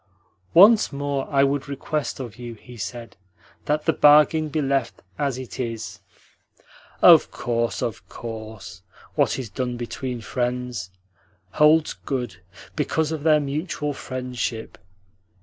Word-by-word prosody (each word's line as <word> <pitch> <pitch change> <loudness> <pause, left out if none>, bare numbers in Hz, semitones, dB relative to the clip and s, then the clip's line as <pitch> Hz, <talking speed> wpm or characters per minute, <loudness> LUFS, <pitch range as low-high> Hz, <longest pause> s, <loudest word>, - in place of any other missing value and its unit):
"Once 210 +5 +7
more 140 -1 -2
I 140 -2 +3
would 140 +1 0
request 140 +1 -3
of 120 -5 -7
you," 120 -1 -7
he 120 +3 -14
said, 115 +1 -7 0.5
"that 150 +1 0
the 160 - +3
bargain 150 +1 +5
be 155 - -1
left 135 -4 -1 0.2
as 140 -4 0
it 130 -1 -8
is." 115 -4 -4 1.0
"Of - - +8
course, 115 -1 -2
of 115 - -5
course. 110 -6 -8 0.3
What - - +1
is 125 -6 -6
done 125 -2 -3
between 125 +1 -4
friends 125 -3 -3 0.6
holds 150 - +4
good 125 - -4 0.4
because 160 -1 0
of 160 -2 -3
their 155 0 +4
mutual 150 +1 -3
friendship. 125 -4 -5
130 Hz, 130 wpm, -23 LUFS, 120-150 Hz, 1.0 s, Of